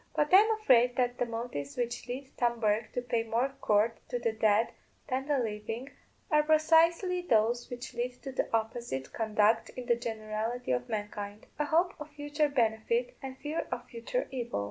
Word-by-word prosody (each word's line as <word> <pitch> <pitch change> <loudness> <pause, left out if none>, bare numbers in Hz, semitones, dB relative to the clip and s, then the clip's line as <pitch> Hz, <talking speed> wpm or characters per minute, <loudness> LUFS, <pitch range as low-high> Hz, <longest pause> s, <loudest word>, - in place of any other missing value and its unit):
But 295 +3 +1
I - - +12
am 430 +3 +6
afraid 245 - +5
that 245 -1 0
the 245 - +1
motives 225 -12 -5
which 240 -1 -2
lead 260 +2 -6
Tom 235 -1 +1
Bourke 215 0 +1
to 245 - -2
pay 235 -2 0
more 230 +4 0
court 215 +2 +2
to 245 - -1
the 235 -1 0
dead 220 0 +3 0.4
than 265 +1 -1
the 290 -2 +2
living 225 +3 -3 0.4
are 300 0 +6
precisely 330 +4 +4
those 235 -5 +2
which 245 +1 -7
lead 240 +1 -2
to 270 - -5
the 260 - -1
opposite 225 - -2
conduct 220 0 +2
in 250 - -7
the 240 -1 +3
generality 225 - -3
of 125 0 -1
mankind 205 0 -5
a 295 - +2
hope 335 +4 +2
of 300 0 -7
future 290 0 -1
benefit 275 - +1
and 265 -1 -6
a - - -29
fear 300 +2 -3
of 245 - -4
future 235 - -2
evil. 240 - -3
240 Hz, 190 wpm, -30 LUFS, 220-285 Hz, 0.4 s, I